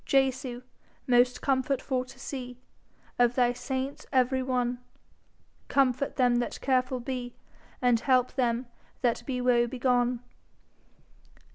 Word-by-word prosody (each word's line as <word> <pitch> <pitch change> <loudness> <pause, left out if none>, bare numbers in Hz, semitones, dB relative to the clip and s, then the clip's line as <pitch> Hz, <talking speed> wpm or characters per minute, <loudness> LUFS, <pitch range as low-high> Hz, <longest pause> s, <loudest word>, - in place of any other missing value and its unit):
Jesu, 260 -2 0 0.4
most 250 0 +3
comfort 270 0 +1
for 255 -2 -1
to - - -14
see 250 -3 -6 0.6
Of 245 0 +4
thy 245 -1 +3
saints 265 +2 -4
every 260 0 +2
one, 250 -1 -1 0.9
Comfort 270 0 +1
them 245 -2 +3
that 240 - -2
careful 255 -1 +1
be, 245 -1 -5 0.5
And 245 -2 +4
help 255 0 +2
them 245 -1 0 0.4
that 240 -2 +2
be 250 -2 -2
woe 240 -1 +3
begone. 245 -1 +1
250 Hz, 120 wpm, -28 LUFS, 245-260 Hz, 0.9 s, Of